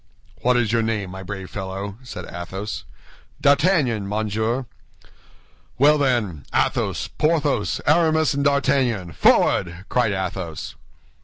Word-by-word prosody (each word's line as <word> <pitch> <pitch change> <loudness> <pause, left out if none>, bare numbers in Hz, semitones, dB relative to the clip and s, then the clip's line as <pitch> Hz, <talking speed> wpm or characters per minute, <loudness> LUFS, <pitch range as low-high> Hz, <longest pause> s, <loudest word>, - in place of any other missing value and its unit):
"What 125 0 +3
is 115 -3 +1
your 115 0 +2
name, 110 -4 -2
my 95 +1 -7
brave 95 0 -7
fellow?" 100 +2 -5
said 130 - -8
Athos. 95 +4 -6 0.5
"D'Artagnan, 140 - +2
monsieur." 110 +4 -1 1.1
"Well, 150 +3 +5
then, 115 - 0
Athos, - - 0
Porthos, 150 - 0
Aramis, 160 0 +3
and 140 0 -1
D'Artagnan, 135 - +1
forward!" 85 +3 +2
cried 125 -4 +2
Athos. 95 -4 -4
110 Hz, 110 wpm, -22 LUFS, 95-140 Hz, 1.1 s, Well